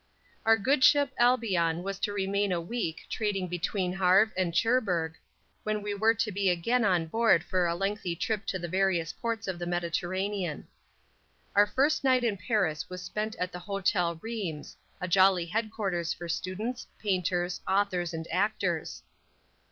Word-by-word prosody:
Our 225 0 +6
good 260 +6 +2
ship 285 0 +5
Albion 190 -9 +2
was 195 0 -4
to 205 - -1
remain 200 0 0
a 175 - +1
week 170 -2 -3
trading 200 -4 -1
between 180 +1 -2
Havre 190 +3 +4
and 180 -2 -1
Cherbourg, 190 -10 +1 0.5
when 215 -1 -2
we 205 0 -2
were 220 +3 +3
to 220 -1 -1
be 195 -1 +1
again 225 +8 +1
on 180 -5 +2
board 225 -1 +3
for 180 -2 +1
a 170 - 0
lengthy 195 -2 -2
trip 210 +3 -2
to 185 - -1
the 175 -1 -5
various 185 -2 +1
ports 230 -2 -3
of 185 -2 -3
the 175 - -4
Mediterranean. 175 0 -2 0.9
Our 205 +1 +6
first 280 +8 +1
night 255 -2 +3
in 225 -4 +1
Paris 185 - -1
was 180 0 -7
spent 215 +5 -3
at 180 0 -3
the 180 - -7
Hotel 180 -2 0
Reims, 200 -10 -5 0.2
a 180 - -3
jolly 185 -1 +4
headquarters 195 -3 -2
for 175 - -8
students, 205 +9 -3
painters, 180 -3 -1
authors 190 -3 +1
and 165 0 -5
actors. 185 -3 -1
190 Hz, 160 wpm, -29 LUFS, 175-215 Hz, 0.9 s, Our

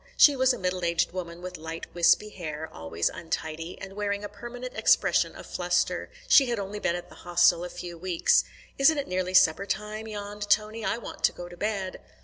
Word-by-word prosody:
She 290 - +8
was 260 0 +4
a 250 - -2
middle 180 -2 -2
aged 170 -1 +1
woman 175 -1 -6
with 180 0 -6
light 160 +1 -7
wispy 175 +4 +4
hair, 160 -5 -6
always 80 +1 -2
untidy, 165 0 -4
and 195 0 -8
wearing 205 0 -2
a 205 - -5
permanent 240 +4 -8
expression - - +3
of - - -10
fluster. - - 0 0.2
She 270 - +7
had 240 -1 -1
only 200 +1 -4
been 170 - 0
at 175 0 -7
the - - -15
Hostel 175 -1 +4
a 180 - -5
few 175 -1 -8
weeks. 180 -1 +3 0.4
"Isn't 295 +3 +5
it 285 - -2
nearly 185 0 -1
supper 170 +3 +5
time?" 215 +2 -3
yawned 205 -1 -6
Tony. 215 +2 +2
"I 230 - 0
want 235 - -9
to - - +4
go 175 - -8
to 175 - -11
bed." 195 -1 -3
185 Hz, 205 wpm, -27 LUFS, 170-210 Hz, 0.4 s, She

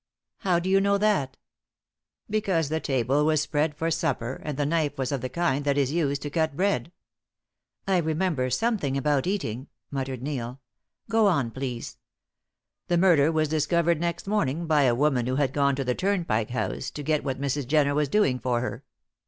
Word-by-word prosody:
"How 180 -3 +2
do 175 +2 -2
you 195 +1 +4
know 200 0 +3
that?" 195 -11 +1 0.9
"Because 190 -8 0
the 160 +1 0
table 135 0 +1
was 155 0 +3
spread 150 +1 0
for 165 +2 -1
supper, 135 -6 -2
and 150 -3 -4
the 145 - 0
knife 155 -1 0
was 130 0 -2
of 140 -3 -2
the 130 - -3
kind 145 -2 0
that 140 -1 +1
is 140 -1 +1
used 145 -4 0
to 145 - -4
cut 160 -2 0
bread." 175 -5 0 1.0
"I 190 -1 +3
remember 160 -5 0
something 145 - 0
about 145 +1 +1
eating," 135 - -2 0.2
muttered 135 -2 -4
Neil. 130 -3 -4 0.5
"Go, 225 -1 +3
on, 140 -11 +1
please." 125 -2 -5 0.9
"The 175 - +2
murder 165 -4 +4
was 155 -1 +1
discovered 160 +2 +1
next 170 0 -2
morning 170 -6 0
by 150 -3 +3
a 120 -2 +3
woman 130 -3 +1
who 130 - 0
had 135 -2 +1
gone 140 -1 +2
to 135 - -2
the 125 -1 0
Turnpike 170 - 0
House 125 - -3
to 145 - -7
get 155 +1 +1
Mrs. 140 0 -2
Jenner 145 0 +3
was 150 -1 +1
doing 140 -9 +2
for 120 -2 0
her. 125 +1 -5
145 Hz, 185 wpm, -26 LUFS, 135-170 Hz, 1.0 s, you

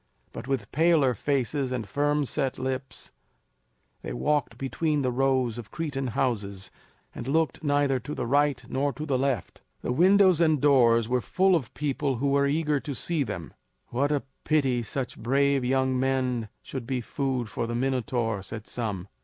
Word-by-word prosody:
But - - -7
with 130 -7 -2
paler 155 -4 +4
faces 135 +2 -1
and 120 -5 -3
firm 145 +5 +1
set 130 +2 -1
lips, 130 0 -4 0.9
they - - -5
walked 125 - 0
between 145 +3 -1
the 130 - +1
rows 130 -2 +1
of 110 - -9
Cretan 145 -5 -3
houses, 100 -7 -1 0.4
and - - -7
looked 155 0 0
neither 145 -2 +2
to 145 +5 -6
the - - -2
right 145 +1 +2
nor 140 +1 0
to 150 +5 -5
the 135 -4 0
left. 130 -7 -2 0.2
The - - -2
windows 185 +3 +5
and 155 -3 +4
doors 120 -5 +4
were 125 +1 +1
full 190 +6 +3
of 135 -8 -2
people 140 0 -1
who 140 +4 0
were 140 0 +3
eager 150 0 +1
to 140 -1 -5
see 165 +4 -1
them. 85 - -4 0.4
"What 140 +5 0
a 145 -2 0 0.2
pity 135 -5 +2
that 115 - -7
such 130 +1 -4
brave 140 +2 +2
young 130 0 +1
men 130 -4 0
should 130 -4 -6
be 130 -1 -1
food 130 -1 -2
for 115 +2 -3
the 120 - -3
Minotaur," 120 -4 -1
said 110 +3 -8
some. 100 -6 -4
135 Hz, 175 wpm, -27 LUFS, 120-145 Hz, 0.9 s, windows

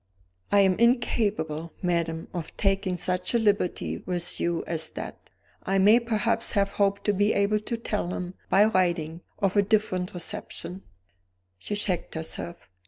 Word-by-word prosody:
"I 205 - +6
am 190 0 +3
incapable, 205 - +1
madam, 170 -2 -1
of 170 -3 -6
taking 195 -2 +1
such 180 +4 0
a - - +6
liberty 205 -5 0
with 175 -1 -1
you 170 -1 0
as 160 -2 -2
that; - - -8 0.3
I 195 +1 0
may 210 +5 +6
perhaps 230 0 0
have 200 -1 +2
hoped 200 0 +1
to 205 - +2
be 205 +2 +2
able 200 +1 +2
to 230 +2 -4
tell 210 -5 -2
him, 180 0 -4 0.2
by 200 +2 +6
writing, 175 -5 0 0.2
of 195 -1 0
a 205 - +6
different 190 -3 0
reception 175 +1 -3 0.4
" 90 0 -47
She 205 - -4
checked 185 -5 -1
herself. 160 +2 -5
185 Hz, 160 wpm, -26 LUFS, 170-205 Hz, 0.4 s, I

